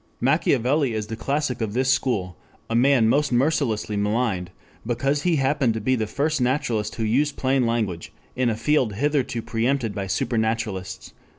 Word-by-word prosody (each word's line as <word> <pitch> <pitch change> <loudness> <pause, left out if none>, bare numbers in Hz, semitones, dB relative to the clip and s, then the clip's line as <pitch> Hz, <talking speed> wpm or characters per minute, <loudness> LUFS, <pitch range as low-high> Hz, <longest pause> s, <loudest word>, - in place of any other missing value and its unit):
Machiavelli 135 -1 +2
is 110 -1 -2
the 110 - -5
classic 135 +1 -2
of 110 -2 -2
this 130 +2 +2
school, 95 -10 -1 0.4
a - - +1
man 125 -1 +4
most 145 +4 +2
mercilessly 120 -5 +1
maligned, 105 -3 0 0.3
because 135 +5 0
he 175 +1 +2
happened 135 -4 +1
to - - -2
be 130 +5 +1
the 110 -3 -2
first 145 +4 -1
naturalist 120 -5 0
who 115 - -3
used 140 +7 +1
plain 130 -2 +1
language 110 -8 -2 0.2
in 125 -1 +1
a 110 - 0
field 130 -5 +1
hitherto 130 -1 -1
preempted 115 0 -1
by 100 -1 -4
supernaturalists. 110 -1 -2
120 Hz, 165 wpm, -23 LUFS, 110-140 Hz, 0.4 s, man